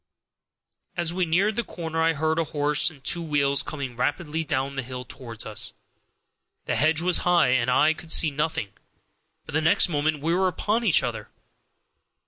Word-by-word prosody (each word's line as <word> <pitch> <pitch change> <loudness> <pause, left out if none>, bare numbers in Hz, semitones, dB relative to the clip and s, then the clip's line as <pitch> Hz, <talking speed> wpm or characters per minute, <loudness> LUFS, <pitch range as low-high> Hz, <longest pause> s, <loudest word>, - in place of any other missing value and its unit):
As 170 -1 0
we 180 -1 -1
neared 195 +6 +1
the 235 - -1
corner 165 -5 -4
I 165 0 +3
heard 160 +2 0
a - - +2
horse 150 0 +2
and 140 -4 -17
two 170 - +1
wheels 145 -3 +1
coming 140 -5 -6
rapidly 160 +5 -2
down 140 -2 -2
the 135 - -3
hill 125 0 -7
toward 120 -4 -6
us. - - -3 0.9
The - - -1
hedge 155 +2 +2
was 180 0 +4
high, 175 -6 +3
and 125 -1 +1
I 150 +5 +4
could 160 0 -7
see 155 - +4
nothing, 150 -7 -2 0.8
but - - -10
the 155 - +1
next 160 +2 +3
moment 150 -1 -1
we 165 +1 +1
were 190 +1 +2
upon 210 +6 -1
each 195 -9 +4
other. - - -5
155 Hz, 180 wpm, -25 LUFS, 140-170 Hz, 0.9 s, was